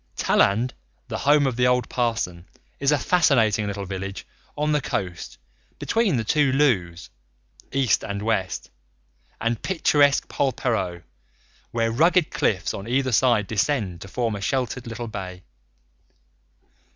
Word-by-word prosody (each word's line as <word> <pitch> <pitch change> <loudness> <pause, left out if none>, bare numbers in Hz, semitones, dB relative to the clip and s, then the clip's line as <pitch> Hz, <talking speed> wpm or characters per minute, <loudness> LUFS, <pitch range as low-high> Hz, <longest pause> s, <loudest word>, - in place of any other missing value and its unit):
Talland, 115 +6 +2 0.4
the - - -3
home 145 0 +4
of 130 -3 -1
the 125 0 +3
old 125 -2 +2
parson, 110 -8 -2 0.3
is 140 +1 +2
a 150 - +4
fascinating 115 - +2
little 100 -1 -4
village 95 +1 -6 0.3
on 150 +1 0
the 150 -1 +2
coast, 90 -8 -4 0.4
between 225 - +1
the 115 - -1
two 145 +5 +2
Looes 95 - +1 0.6
East 135 -6 +2
and 100 0 -4
West 95 -6 -2 0.7
and 115 -1 -1
picturesque 145 -6 +2
Polperro, 115 -10 -1 0.7
where 115 -1 0
rugged 165 +7 +3
cliffs 95 -2 0
on 100 +2 -7
either 130 +2 +1
side 120 -2 +3
descend 100 - -1
to - - -8
form 115 +1 -2
a 100 - -6
sheltered 125 +2 -2
little 115 +1 -5
bay. 95 -4 -7
115 Hz, 135 wpm, -24 LUFS, 100-135 Hz, 0.7 s, home